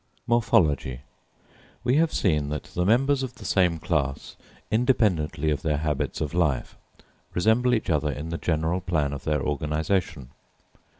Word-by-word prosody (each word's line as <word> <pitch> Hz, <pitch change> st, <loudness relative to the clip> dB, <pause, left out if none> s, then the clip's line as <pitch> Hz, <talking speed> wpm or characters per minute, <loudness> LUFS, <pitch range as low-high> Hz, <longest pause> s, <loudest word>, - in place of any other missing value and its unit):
Morphology. 80 Hz, -, +2 dB, 0.8 s
We 125 Hz, +3 st, +2 dB
have 165 Hz, 0 st, +3 dB
seen 75 Hz, -6 st, +1 dB
that 75 Hz, +1 st, -3 dB
the 90 Hz, -, 0 dB
members 135 Hz, +5 st, +3 dB
of 130 Hz, -2 st, -5 dB
the -, -, -12 dB
same 90 Hz, -4 st, +2 dB
class, 70 Hz, -3 st, -2 dB, 0.4 s
independently 100 Hz, -, +1 dB
of 70 Hz, -3 st, -1 dB
their 75 Hz, -2 st, 0 dB
habits 75 Hz, -1 st, -2 dB
of 75 Hz, 0 st, -2 dB
life, 80 Hz, -8 st, 0 dB, 0.6 s
resemble 110 Hz, +7 st, +3 dB
each 110 Hz, -, -2 dB
other 75 Hz, -1 st, +1 dB
in 75 Hz, +3 st, -6 dB
the 85 Hz, -, -4 dB
general 80 Hz, +2 st, 0 dB
plan 80 Hz, -6 st, 0 dB
of 70 Hz, -, -7 dB
their 75 Hz, -3 st, 0 dB
organisation. 75 Hz, -1 st, -2 dB
80 Hz, 145 wpm, -25 LUFS, 75-110 Hz, 0.8 s, have